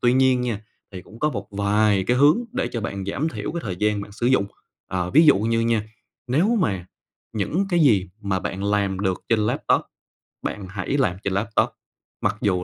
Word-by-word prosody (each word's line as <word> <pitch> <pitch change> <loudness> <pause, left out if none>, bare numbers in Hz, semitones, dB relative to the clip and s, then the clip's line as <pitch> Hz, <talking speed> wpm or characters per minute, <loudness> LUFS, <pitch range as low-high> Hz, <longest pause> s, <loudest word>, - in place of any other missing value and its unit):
Tuy 120 0 +4
nhiên 130 -1 +4
nha, 115 -4 -2 0.3
thì 90 -2 -7
cũng 110 - -15
có 150 +3 +1
một 100 -6 -5
vài 100 -1 +2
cái 125 - +2
hướng 145 - +5
để 260 - -1
cho 115 - -2
bạn 100 -2 -4
giảm 140 +11 -1
thiểu - - -5
cái 170 - -3
thời 95 -4 -3
gian 105 +1 +1
bạn 100 0 -9
sử 120 +3 -2
dụng. 130 -6 +3 0.4
Ờ, 90 -1 -2
ví 155 +4 +6
dụ 145 - +7
như 115 +2 +1
nha, 115 -2 +1 0.4
nếu 155 - +2
mà 95 - -1 0.5
những 155 - -1
cái 175 -2 +2
gì 100 - +4
mà 95 -2 -1
bạn 95 +1 -4
làm 100 -2 0
được 95 -3 -1
trên 115 - +3
laptop - - +1 0.6
bạn 100 -2 -4
hãy 100 +9 -2
làm 90 -10 +1
trên 100 - -1
laptop, 110 +3 +1 0.5
mặc - - +1
dù 90 -3 +1
105 Hz, 210 wpm, -23 LUFS, 100-125 Hz, 0.6 s, dụ